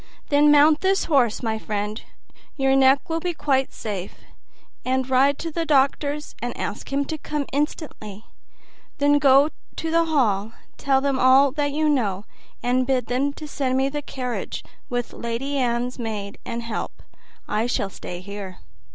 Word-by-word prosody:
"Then 290 Hz, +1 st, +5 dB
mount 295 Hz, +1 st, +6 dB
this 385 Hz, +1 st, +2 dB
horse, 260 Hz, -8 st, +2 dB
my 220 Hz, -1 st, -1 dB
friend 210 Hz, 0 st, -3 dB, 0.6 s
your 270 Hz, -1 st, +3 dB
neck 270 Hz, +1 st, +4 dB
will 325 Hz, 0 st, -1 dB
be 350 Hz, 0 st, -3 dB
quite 270 Hz, -3 st, +1 dB
safe 200 Hz, -4 st, -5 dB, 0.7 s
and 260 Hz, 0 st, 0 dB
ride 270 Hz, +2 st, +3 dB
to 330 Hz, 0 st, -5 dB
the 330 Hz, +2 st, -1 dB
doctor's 290 Hz, 0 st, +1 dB
and 245 Hz, 0 st, -4 dB
ask 205 Hz, -, -5 dB
him 280 Hz, +1 st, 0 dB
to 315 Hz, +2 st, -5 dB
come 295 Hz, -1 st, -3 dB
instantly; 270 Hz, -, -3 dB, 0.7 s
then 290 Hz, 0 st, +4 dB
on 275 Hz, +2 st, +6 dB, 0.2 s
to 325 Hz, -, -3 dB
the 335 Hz, 0 st, +3 dB
hall; 225 Hz, -9 st, +1 dB, 0.2 s
tell 270 Hz, -1 st, +2 dB
them 275 Hz, -1 st, 0 dB
all 265 Hz, +2 st, +6 dB
that 290 Hz, 0 st, -1 dB
you 310 Hz, +2 st, +1 dB
know, 215 Hz, -9 st, 0 dB, 0.4 s
and 250 Hz, +1 st, +1 dB
bid 255 Hz, -3 st, +1 dB
them 255 Hz, +5 st, 0 dB
send 270 Hz, -3 st, -1 dB
me 270 Hz, +1 st, +2 dB
the 295 Hz, +1 st, -3 dB
carriage, 255 Hz, -4 st, -5 dB, 0.3 s
with 245 Hz, -2 st, -3 dB
Lady 240 Hz, +5 st, -3 dB
Anne's 245 Hz, 0 st, -1 dB
maid 210 Hz, -4 st, -5 dB
and 235 Hz, 0 st, -4 dB
help. 230 Hz, -1 st, -5 dB, 0.4 s
I 215 Hz, +3 st, 0 dB
shall 200 Hz, -5 st, -1 dB
stay 175 Hz, -1 st, -7 dB
here." 200 Hz, -1 st, -7 dB
265 Hz, 160 wpm, -23 LUFS, 230-290 Hz, 0.7 s, mount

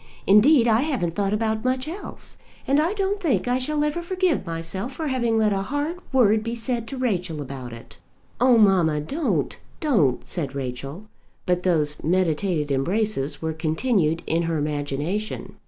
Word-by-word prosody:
Indeed 235 Hz, +6 st, +6 dB
I 225 Hz, +1 st, +4 dB
haven't 255 Hz, -, -1 dB
thought 200 Hz, +1 st, 0 dB
about 220 Hz, 0 st, 0 dB
much 255 Hz, +2 st, 0 dB
else. 360 Hz, +6 st, -7 dB, 0.3 s
And 275 Hz, +2 st, +3 dB
I 335 Hz, +6 st, +1 dB
don't 400 Hz, 0 st, 0 dB
think 300 Hz, -8 st, +1 dB
I 250 Hz, +1 st, +2 dB
shall 295 Hz, +3 st, 0 dB
ever 300 Hz, +3 st, -1 dB
forgive 360 Hz, -, 0 dB
myself 165 Hz, +9 st, -4 dB
for 310 Hz, +2 st, -3 dB
having 235 Hz, -4 st, +1 dB
let 215 Hz, -2 st, +3 dB
a 195 Hz, -, 0 dB
hard 290 Hz, -, -2 dB
word 220 Hz, -5 st, +4 dB
be 230 Hz, +1 st, -3 dB
said 235 Hz, 0 st, -2 dB
to 270 Hz, -, -6 dB
Rachel 185 Hz, -10 st, -1 dB
about 135 Hz, -3 st, -6 dB
it." 115 Hz, 0 st, -12 dB, 0.4 s
"Oh, 250 Hz, 0 st, +5 dB
mamma, 180 Hz, -8 st, +4 dB
don't, 285 Hz, -, -1 dB, 0.2 s
don't," 195 Hz, -, +2 dB
said 140 Hz, -6 st, -3 dB
Rachel. 135 Hz, +7 st, -5 dB, 0.4 s
But 180 Hz, -1 st, +1 dB
those 155 Hz, -5 st, +1 dB
meditated 165 Hz, -2 st, +1 dB
embraces 165 Hz, +1 st, 0 dB
were 160 Hz, 0 st, -1 dB
continued 160 Hz, +1 st, 0 dB
in 165 Hz, +1 st, +1 dB
her 165 Hz, -, 0 dB
imagination. 150 Hz, +7 st, -3 dB
205 Hz, 165 wpm, -24 LUFS, 160-255 Hz, 0.4 s, Indeed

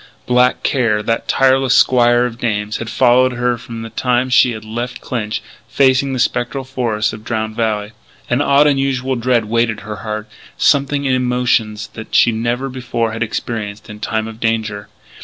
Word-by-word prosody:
Black 125 Hz, 0 st, +2 dB
Care, 115 Hz, -6 st, +1 dB
that 115 Hz, +1 st, -1 dB
tireless 135 Hz, -1 st, +3 dB
squire 120 Hz, -1 st, +4 dB
of 120 Hz, -1 st, -5 dB
dames, 105 Hz, -3 st, -1 dB
had 115 Hz, -, -6 dB
followed 125 Hz, +1 st, +3 dB
her 120 Hz, 0 st, 0 dB
from 115 Hz, -1 st, -8 dB
the 115 Hz, -, -8 dB
time 125 Hz, +2 st, 0 dB
she 125 Hz, -1 st, +5 dB
had 110 Hz, -1 st, -8 dB
left 120 Hz, +3 st, -5 dB
Clinch, 110 Hz, -4 st, -4 dB, 0.2 s
facing 135 Hz, 0 st, +2 dB
the 130 Hz, -, -2 dB
spectral 120 Hz, +2 st, -1 dB
forests 120 Hz, -5 st, -1 dB
of 110 Hz, 0 st, -9 dB
Drowned 110 Hz, -1 st, -3 dB
Valley. 110 Hz, -2 st, -1 dB, 0.4 s
An 120 Hz, +3 st, +1 dB
odd, 140 Hz, 0 st, +4 dB
unusual 135 Hz, -2 st, +1 dB
dread 120 Hz, -1 st, +1 dB
weighted 115 Hz, 0 st, 0 dB
her 105 Hz, 0 st, -7 dB
heart 105 Hz, 0 st, -5 dB, 0.3 s
something 140 Hz, 0 st, +2 dB
in 130 Hz, -, +2 dB
emotions 125 Hz, -4 st, 0 dB
that 110 Hz, 0 st, -7 dB
she 120 Hz, -, +5 dB
never 120 Hz, +4 st, -2 dB
before 125 Hz, -3 st, -2 dB
had 115 Hz, -, -6 dB
experienced 110 Hz, -2 st, -4 dB
in 105 Hz, -, -10 dB
time 110 Hz, 0 st, -2 dB
of 110 Hz, 0 st, -10 dB
danger. 110 Hz, -3 st, -2 dB
120 Hz, 175 wpm, -17 LUFS, 110-130 Hz, 0.4 s, she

